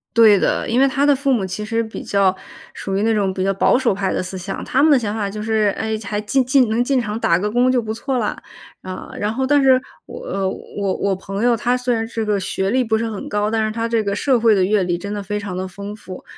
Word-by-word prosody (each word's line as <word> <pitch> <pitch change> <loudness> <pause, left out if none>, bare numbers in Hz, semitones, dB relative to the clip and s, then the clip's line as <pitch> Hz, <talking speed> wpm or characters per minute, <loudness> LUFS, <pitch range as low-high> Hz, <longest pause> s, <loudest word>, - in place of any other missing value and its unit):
对 220 -4 +7
的， - - 0
因 240 +3 +2
为 275 - +5
他 275 +2 +1
的 290 - +5
父 275 0 +1
母 200 -6 0
其 190 +3 -5
实 230 +1 0
比 220 - -7
较 195 -2 +2 0.4
属 195 - -4
于 200 - 0
那 225 - +2
种 200 -3 0
比 185 - -2
较 195 0 +1
保 195 - +3
守 250 -6 +1
派 190 -1 -1
的 - - -1
思 185 +1 -6
想。 195 +2 -5
他 265 - +1
们 315 - +5
的 285 - +6
想 210 -4 -2
法 210 -2 -2
就 210 +1 -6
是， 215 -2 +1
哎， 220 -1 -2
还 210 0 -2
进 260 +5 +1
进 255 -3 +3
能 225 +2 +1
进 260 0 +1
场 215 -1 -4
打 170 - +3
个 210 +3 -2
工 245 +3 +3
就 250 -2 +2
不 220 0 -4
错 260 +3 -2
啦， 215 -3 -2 0.4
嗯， 185 0 -7
然 210 +2 -1
后 265 +2 -1
但 290 +1 +3
是 260 -1 +5 0.3
我， 485 - -9
呃， 195 - -2
我 200 -1 -4
我 200 - +1
朋 195 +3 -5
友， 245 -1 +4
他 245 +3 +1
虽 250 -1 0
然 225 0 -1
这 225 -1 -3
个 210 -1 +1
学 190 +1 -2
历 255 +3 +2
不 220 -2 +1
是 230 0 -2
很 205 - -6
高， 210 +1 -1
但 220 -1 +1
是 215 - -3
他 230 0 -2
这 230 -1 +1
个 200 - -1
社 255 +3 +2
会 225 -2 +4
的 190 - +2
阅 200 0 +2
历 175 -1 -1
真 200 +3 -6
的 205 - -3
非 205 +2 -3
常 200 -3 -5
的 185 0 -3
丰 200 +3 -8
富。 190 -3 -10
215 Hz, 310 characters per minute, -20 LUFS, 200-245 Hz, 0.4 s, 对